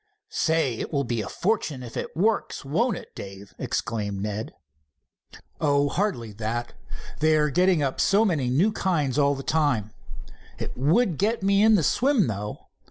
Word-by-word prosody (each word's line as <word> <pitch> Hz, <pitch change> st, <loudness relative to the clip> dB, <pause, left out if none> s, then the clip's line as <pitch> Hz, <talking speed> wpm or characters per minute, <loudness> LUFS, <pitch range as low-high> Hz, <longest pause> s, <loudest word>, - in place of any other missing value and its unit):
"Say, 160 Hz, -8 st, 0 dB
it -, -, -4 dB
will 140 Hz, -3 st, 0 dB
be 120 Hz, -3 st, -2 dB
a 100 Hz, -, -6 dB
fortune 175 Hz, -, -1 dB
if 120 Hz, -, -9 dB
it -, -, -5 dB
works, 210 Hz, -4 st, 0 dB
won't 200 Hz, -, +1 dB
it, -, -, -12 dB
Dave?" 100 Hz, 0 st, -10 dB
exclaimed 105 Hz, -3 st, -2 dB
Ned. 105 Hz, +2 st, -4 dB, 1.1 s
"Oh, 145 Hz, -1 st, +2 dB
hardly 170 Hz, -, -1 dB
that. 115 Hz, +3 st, -4 dB, 0.5 s
They 155 Hz, +1 st, +4 dB
are 150 Hz, -1 st, +2 dB
getting 180 Hz, -1 st, +3 dB
up 135 Hz, -1 st, -1 dB
so 205 Hz, +3 st, +4 dB
many 150 Hz, -, 0 dB
new 165 Hz, -, +3 dB
kinds 155 Hz, -, 0 dB
all 140 Hz, 0 st, +4 dB
of -, -, -5 dB
the 135 Hz, -, -6 dB
time. 140 Hz, -10 st, +1 dB, 0.7 s
It -, -, -5 dB
would 165 Hz, -, +2 dB
get 215 Hz, +2 st, +1 dB
me 200 Hz, +1 st, +3 dB
into 220 Hz, 0 st, +6 dB
the 175 Hz, -, +2 dB
swim, 255 Hz, -, +3 dB
though. 105 Hz, -2 st, -5 dB
145 Hz, 170 wpm, -25 LUFS, 120-190 Hz, 1.1 s, into